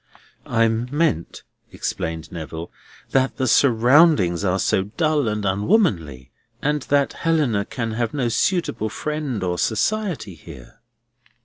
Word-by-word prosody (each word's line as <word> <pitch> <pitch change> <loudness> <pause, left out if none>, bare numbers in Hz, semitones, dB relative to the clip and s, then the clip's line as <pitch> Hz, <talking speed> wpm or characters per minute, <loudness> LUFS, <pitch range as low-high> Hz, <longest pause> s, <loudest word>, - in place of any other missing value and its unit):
"I 115 0 +3
meant," 120 - -1 0.3
explained 80 -1 -4
Neville, 80 0 -7 0.4
"that 135 0 +1
the 130 - 0
surroundings 120 - +4
are 95 -1 +1
so 95 0 +1
dull 155 -5 +2
and 105 -1 -2
unwomanly, 95 - 0 0.3
and 150 +2 0
that 140 -1 +2
Helena 145 -11 0
can 115 -1 -4
have 115 0 -2
no 135 -5 -1
suitable 120 - 0
friend 145 -5 -3
or 90 -1 -1
society 145 - -1
here." 70 - -13
115 Hz, 120 wpm, -22 LUFS, 95-150 Hz, 0.4 s, surroundings